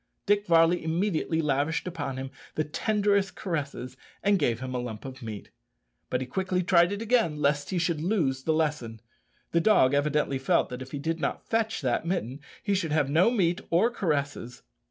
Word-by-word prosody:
Dick 205 0 +2
Varley 165 0 +4
immediately 165 -1 0
lavished 145 +2 0
upon 145 -7 -4
him 135 0 -5 0.2
the 155 - +1
tenderest 200 +4 0
caresses 140 -7 -4 0.3
and 200 -1 +3
gave 120 -6 +1
him 130 0 -5
a 125 - -1
lump 120 -2 -6
of 130 0 -8
meat. 110 -3 -7 0.6
But 125 - -1
he - - -2
quickly 185 +7 -1
tried 175 0 +4
it 205 +2 -3
again 220 -10 +2
lest 145 0 +1
he 185 - -1
should 165 -2 0
lose 160 -8 0
the 160 - 0
lesson. 150 -8 -1 0.5
The 170 - +3
dog 165 -10 +4
evidently 145 -1 +1
felt 135 - +2
that 125 +1 -6
if 130 - -7
he 145 - -5
did 165 +4 -2
not 140 - -2
fetch 225 -1 0
that 125 -3 0
mitten 160 -7 -2 0.2
he 205 - 0
should 180 -5 -1
have 145 -3 +1
no 170 +8 +5
meat 180 -8 +1
or 195 +8 +3
caresses. 145 - -2
160 Hz, 190 wpm, -27 LUFS, 135-185 Hz, 0.6 s, no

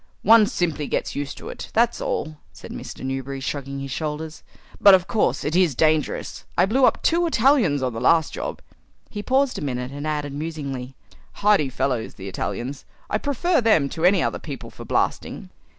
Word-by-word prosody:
"One 220 0 +7
simply 160 -6 -1
gets - - -2
used 145 0 -4
to - - -8
it, - - -8
that's 235 +1 +2
all," 155 0 -3 0.2
said 80 - -11
Newberry, 135 +1 -5
shrugging 140 0 -4
his 135 -1 -6
shoulders; 155 +2 -4 0.4
"but 200 -1 +9
of 185 -1 0
course 175 - +1
it 155 +3 -1
is 175 -7 +3
dangerous. 155 +1 0
I 180 - +5
blew 255 +7 +3
up - - +2
two 340 +1 +3
Italians 235 - +3
on 125 -2 -1
the 115 - -5
last 165 -2 +3
job." - - -5 0.5
He 205 - -4
paused 265 +3 +1
a - - -5
minute 125 -2 -3
and 145 +2 -5
added 150 -2 -2
musingly, 140 -4 -5 0.4
"Hardy 200 -9 +3
fellows, 125 -3 -2
the 95 - -8
Italians. 125 +7 -4 0.3
I 215 - +1
prefer 285 +5 +1
them 190 -12 +3
to 160 - -5
any 185 0 +5
other - - -1
people 140 -5 -8
for - - -10
blasting." - - -2
155 Hz, 180 wpm, -23 LUFS, 135-205 Hz, 0.5 s, but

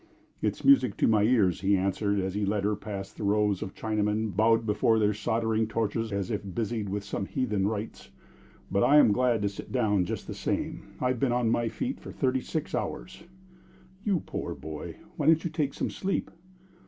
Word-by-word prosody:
"It - - 0
is - - -11
music 280 0 +5
to - - +3
my 110 -2 +4
ears," 105 -7 +3
he 100 +1 +3
answered, 100 +2 0
as 95 -1 -2
he 105 +1 -1
led 100 0 0
her 105 +1 +1
past 100 -2 -7
the - - -5
rows 105 -1 +2
of 95 -3 -6
Chinamen 105 -1 -1
bowed 115 +2 +3
before 110 +1 +2
their 105 -1 +3
soldering 110 +1 0
torches 110 0 -1
as 100 -2 -2
if - - -1
busied 110 -2 -2
with 100 +1 -3
some 100 -1 -4
heathen 105 -7 0
rites. 110 0 -5 0.6
"But 100 +1 +2
I'm 145 -6 +6
glad 120 -1 +2
to 100 - +2
sit 100 - -9
down 105 -7 +2
just - - -4
the - - -6
same. - - -3
I've 125 -1 0
been 135 -1 +2
on 120 -2 +1
my 115 -1 +1
feet 255 - -3
for - - -9
thirty 130 -1 0
six 155 +2 -4
hours." 180 -2 -4 0.8
"You 200 -6 +1
poor - - -5
boy! 80 -1 -7 0.2
Why - - 0
don't 160 0 +5
you 170 - -2
take 150 -4 -1
some - - -2
sleep?" 195 0 -2
110 Hz, 200 wpm, -28 LUFS, 100-120 Hz, 0.8 s, I'm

